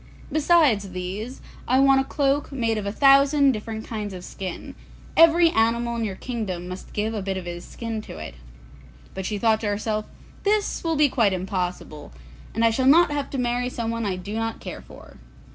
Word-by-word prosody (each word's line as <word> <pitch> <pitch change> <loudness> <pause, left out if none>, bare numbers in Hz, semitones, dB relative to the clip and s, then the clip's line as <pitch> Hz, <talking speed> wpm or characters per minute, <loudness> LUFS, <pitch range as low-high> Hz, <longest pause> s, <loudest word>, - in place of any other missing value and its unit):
Besides 295 - +3
these, 195 +7 -5 0.3
I 255 +2 +3
want 270 0 +5
a - - -1
cloak 280 +1 0
made 230 -5 0
of 200 - -5
a - - -1
thousand 275 +3 +5
different 220 -1 -5
kinds 210 -4 -5
of 180 - -8
skin; 185 -2 -7 0.4
every 330 +1 +6
animal 235 0 +1
in 230 - -2
your 200 -4 -3
kingdom 190 -7 -4
must 185 +1 -8
give 215 +2 -1
a 215 - -3
bit 190 0 -3
of 185 - -6
his 175 0 -6
skin 230 -2 -5
to 145 - -10
it.' 75 -2 -7 0.8
But 190 -1 -4
she 210 - -2
thought 220 +1 +2
to 220 - -2
herself, 215 +1 -1 0.4
'This 415 0 0
will 330 -1 0
be 300 0 +5
quite 225 -7 +2
impossible, 180 -5 -4 0.4
and 230 +1 +2
I 230 - +4
shall 260 +3 +1
not 330 +4 +6
have 290 -1 -2
to 275 - -4
marry 245 0 0
someone 230 -1 -3
I 190 - -1
do 185 +3 -7
not 225 0 -3
care - - -7
for. - - -15
225 Hz, 195 wpm, -24 LUFS, 200-270 Hz, 0.8 s, every